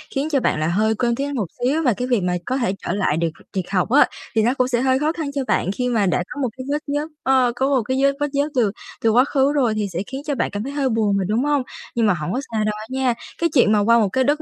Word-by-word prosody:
khiến 285 +3 0
cho 280 -3 +2
bạn 155 - 0
là 155 - 0
hơi 215 +5 +1
quên 235 +1 0
tiếng 280 +2 -2
Anh 285 - -4
một 215 -7 -1 0.2
xíu 290 +6 +1
và 250 -6 +3
cái 250 +6 -3
việc 235 -7 +1
mà 180 0 0
có 260 +2 -1
thể 235 -7 0
trở - - -1
lại 190 -6 0
được 165 0 +1 0.2
việc 185 -2 -3
học 190 +1 0
á 280 +4 +6 0.3
thì 220 - +4
nó 245 +3 +3
cũng 255 -2 +1
sẽ 240 -1 0
hơi 260 0 +2
khó 300 +2 +1
khăn 310 -4 -4
cho 280 - -2
bạn - - +1
khi 250 +4 -2
mà 220 -4 +2
đã 180 -1 +1
có 285 - -5
một 255 - 0
cái 255 - -6
vết 295 +1 0
nhớt 290 +2 -1 0.2
ơ, 260 -2 +3
có 265 +2 +1
một 265 -4 +2
cái 260 - 0
vết 275 - +5
vết 290 - +1
nhớt 285 +2 0
từ 225 -6 +2 0.3
từ 225 - +3
quá 245 +4 +5
khứ 280 0 +2
rồi 250 -7 +2
thì 210 -1 -1
sẽ 170 - -2
khiến 270 +1 -6
cho 290 -3 -1
bạn 245 - 0
cảm 205 +1 -3
thấy 275 - -5
hơi 280 -2 0
buồn 215 -4 +1
mà, 195 - 0
đúng 225 +6 +1
hông? 290 -2 +1 0.3
Nhưng 230 - +2
mà 205 - +4
hổng 175 +2 -3
có 255 - -1
sao 220 -1 0
đâu 210 0 0
á 215 - -7
nha, 260 -1 +1 0.3
cái 335 - +3
chuyện 245 -7 +4
mà 210 - +4
qua 230 +3 +4
một 210 -4 +2
cái 260 +6 +1
đất 295 +3 +1
250 Hz, 325 wpm, -21 LUFS, 210-275 Hz, 0.3 s, á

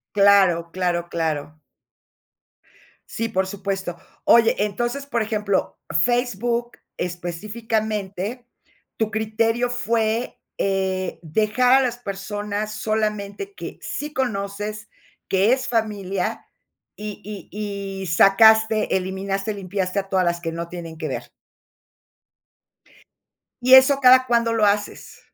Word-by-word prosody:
Claro, 195 -4 +5
claro, 175 -1 -1
claro. 155 -2 -3 1.5
Sí, 230 0 -3
por 190 -3 0
supuesto. 195 -2 -4 0.3
Oye, 230 -1 +6
entonces, 240 +7 -1
por 240 -5 -1
ejemplo, 210 -3 -1 0.2
Facebook 240 0 0 0.2
específicamente, 210 +4 -3 0.5
tu 220 -1 0
criterio 225 +2 0
fue, 230 0 -1 0.2
eh, 190 -1 -1
dejar 215 +9 +2
a 270 - +6
las 240 -2 -1
personas 205 0 -4
solamente 215 - -2
que - - -8
sí 295 +1 -5
conoces, 210 -3 -3 0.4
que 195 +5 +4
es 260 - -2
familia, 205 -5 -2 0.5
y 210 -1 -7
y 200 -1 -6
y 190 - -4
sacaste, 220 +5 +5
eliminaste, 195 +2 -3
limpiaste 195 0 -2
a 195 0 -6
todas 185 -1 +2
las 170 0 0
que 165 -1 -3
no 170 +1 -5
tienen 170 -2 -8
que 155 -1 -4
ver. - - -5 2.3
¿Y 255 +1 +4
eso 265 +1 +8
cada 255 0 +7
cuándo 235 -1 +2
lo 220 -2 +3
haces? 205 0 -1
210 Hz, 110 wpm, -22 LUFS, 190-230 Hz, 2.3 s, eso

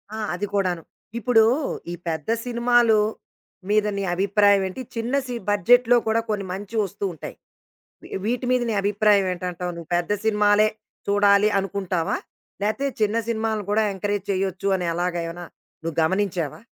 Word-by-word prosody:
ఆ! - - -5 0.2
అది 205 - -2
కూడాను. 185 -4 0 0.4
ఇప్పుడు 230 -1 +4 0.5
ఈ - - -4
పెద్ద 160 0 -3 0.2
సినిమాలు 240 -2 +3 0.7
మీద 210 0 +3
నీ 200 - -1
అభిప్రాయం 200 +1 +4
ఏంటి? 190 +7 -7
చిన్న 230 +3 -3
సి 245 - -4
బడ్జెట్‌లో 245 +5 +5
కూడా 225 +1 +2
కొన్ని 205 -2 -1
మంచి 200 +4 -7
ఒస్తూ 200 +1 -5
ఉంటాయి. 160 - -8 0.7
వి - - -12 0.2
వీటి 245 +3 -1
మీద 250 -1 +2
నీ - - 0
అభిప్రాయం 205 0 +3
ఏంటంటావు? 180 0 -4
నువ్వు 170 -1 -10
పెద్ద 175 +2 -2
సినిమాలే 210 0 +4 0.4
చూడాలి 200 0 +4
అనుకుంటావా? 190 -3 -1 0.5
లేతే 220 +7 0
చిన్న 215 +1 +2
సినిమలను 220 -2 -1
కూడా 215 +1 +3
ఎంకరేజ్ 205 0 -2
చేయొచ్చు 190 0 -1
అని 180 -2 -3
ఎలాగ 175 +1 -1
ఏమైనా 175 +1 -7 0.4
నువ్వు 165 -1 -4
గమనించావా? 180 -3 -1
205 Hz, 145 wpm, -23 LUFS, 185-220 Hz, 0.7 s, బడ్జెట్‌లో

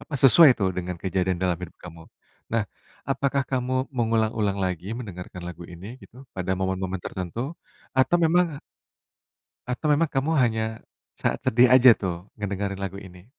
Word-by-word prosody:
apa, 150 - -8
sesuai 140 +4 +8
itu 100 - -1
dengan 90 0 -4
kejadian 95 0 -1
dalam 90 -1 0
hidup 90 -2 -8
kamu. 85 -2 -10 0.5
Nah, 115 -2 +1 0.4
apakah 140 0 +1
kamu 130 0 -1
mengulang-ulang 110 -4 0
lagi 90 +2 -3
mendengarkan 90 -6 -8
lagu 90 0 -9
ini 100 +9 -10
gitu 130 +3 -15
pada 95 0 -3
momen-momen 95 0 -2
tertentu? 115 - -4 0.4
Atau 130 +6 +3
memang 165 -3 +2 1.1
atau 125 +5 -2
memang, 150 +2 +3
kamu 135 +3 0
hanya 115 -4 +2 0.5
saat - - -1
sedih 125 +2 +4
aja 130 -2 +8
tuh 90 0 -5
ngedengerin 100 -1 -3
lagu 100 0 -5
ini? 90 -2 -13
105 Hz, 150 wpm, -25 LUFS, 90-130 Hz, 1.1 s, sesuai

